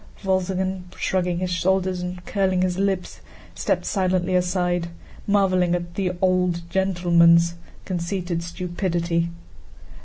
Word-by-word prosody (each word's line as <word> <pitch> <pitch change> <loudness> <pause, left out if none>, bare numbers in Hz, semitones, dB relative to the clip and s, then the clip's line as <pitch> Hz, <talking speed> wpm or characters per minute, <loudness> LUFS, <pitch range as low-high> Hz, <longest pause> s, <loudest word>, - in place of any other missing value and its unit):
Wolzogen, 190 -1 -1
shrugging 180 -2 0
his 180 0 -2
shoulders 185 0 +1
and 180 0 -6
curling 190 -2 +1
his 185 0 -1
lips, 195 -2 -1 0.3
stepped - - -1
silently 185 -2 0
aside, 180 -1 +1 0.4
marveling 185 -3 +3
at 175 -1 -5
"the 185 -1 -1
old 180 -2 +1
gentleman's" 170 -2 +4 0.3
conceited 175 -1 -2
stupidity. 170 -1 -1
180 Hz, 110 wpm, -23 LUFS, 175-190 Hz, 0.4 s, gentleman's